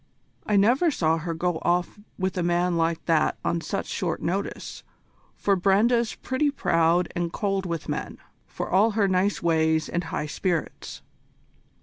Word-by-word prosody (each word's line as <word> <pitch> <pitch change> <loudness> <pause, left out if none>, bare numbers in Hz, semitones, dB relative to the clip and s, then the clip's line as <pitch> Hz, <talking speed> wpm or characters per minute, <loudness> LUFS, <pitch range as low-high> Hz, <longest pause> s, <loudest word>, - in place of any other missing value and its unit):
I 210 - +2
never 240 - +4
saw 165 - +1
her 165 +1 -4
go 175 0 -1
off 175 +3 0 0.2
with 190 -1 -2
a 180 - -1
man 175 +1 +1
like 165 0 0
that 165 -2 +2
on 170 - 0
such 195 - -3
short 175 -4 -2
notice, 195 +4 -4 0.5
for 200 - +1
Brenda's 215 +5 +2
pretty 260 +3 0
proud 170 - +2
and 170 -1 -1
cold 195 -2 -1
with 170 -2 -4
men, - - -4 0.3
for - - -5
all 210 +4 +3
her 200 -2 +3
nice 190 +1 +1
ways 160 -1 +2
and 175 0 -2
high 165 - -3
spirits." 170 +2 -3
180 Hz, 155 wpm, -25 LUFS, 165-200 Hz, 0.5 s, never